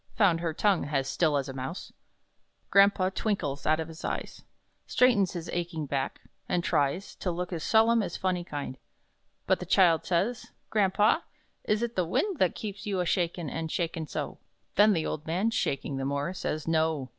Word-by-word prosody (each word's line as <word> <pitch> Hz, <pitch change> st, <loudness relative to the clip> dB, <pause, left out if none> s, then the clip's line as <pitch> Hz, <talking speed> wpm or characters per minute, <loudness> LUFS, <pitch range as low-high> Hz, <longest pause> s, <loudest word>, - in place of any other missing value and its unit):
(Found 190 Hz, -7 st, +4 dB
her 170 Hz, -1 st, -1 dB
tongue, 190 Hz, +1 st, +2 dB
has 135 Hz, -2 st, -1 dB
Still 155 Hz, 0 st, +2 dB
as 140 Hz, -1 st, -2 dB
a 135 Hz, -, -6 dB
Mouse.) 135 Hz, +7 st, -6 dB, 0.8 s
Grandpa 195 Hz, -1 st, +5 dB
twinkles 160 Hz, -12 st, -2 dB
out 155 Hz, +1 st, +3 dB
of 160 Hz, -, -3 dB
his 160 Hz, 0 st, -11 dB
eyes, -, -, -4 dB, 0.5 s
Straightens 225 Hz, -8 st, +3 dB
his 175 Hz, -2 st, -5 dB
aching 170 Hz, -3 st, -3 dB
back, 135 Hz, -1 st, -3 dB, 0.3 s
and 175 Hz, -, +1 dB
tries 145 Hz, +7 st, 0 dB
To 185 Hz, -, -2 dB
look 180 Hz, +1 st, -3 dB
as 165 Hz, -, -4 dB
solemn 225 Hz, +1 st, +4 dB
as 180 Hz, -4 st, -4 dB
Phunny 185 Hz, -2 st, -1 dB
kind. 145 Hz, -5 st, -6 dB, 0.7 s
But -, -, +2 dB
the -, -, -5 dB
child 170 Hz, -4 st, +4 dB
says: 195 Hz, +7 st, 0 dB, 0.2 s
"Grampa, 210 Hz, -, +3 dB, 0.4 s
is 215 Hz, +2 st, +1 dB
it 235 Hz, 0 st, -3 dB
the 185 Hz, -, +2 dB
wind 335 Hz, -, -1 dB
That 185 Hz, -, +2 dB
keeps 205 Hz, -1 st, -6 dB
you 195 Hz, -2 st, -1 dB
a 180 Hz, -, +1 dB
shakin' 170 Hz, -2 st, 0 dB
an' 160 Hz, +3 st, -3 dB
shakin' 165 Hz, -1 st, -2 dB
so?" -, -, -5 dB, 0.3 s
Then 210 Hz, +1 st, +6 dB
the 160 Hz, -4 st, 0 dB
old 150 Hz, +1 st, -4 dB
man, 185 Hz, +8 st, +1 dB
shaking 140 Hz, -8 st, -1 dB
the 135 Hz, -, -2 dB
more, 140 Hz, +5 st, -1 dB
says: 155 Hz, -4 st, -3 dB
"No! 160 Hz, -4 st, +1 dB
175 Hz, 185 wpm, -28 LUFS, 155-200 Hz, 0.8 s, Then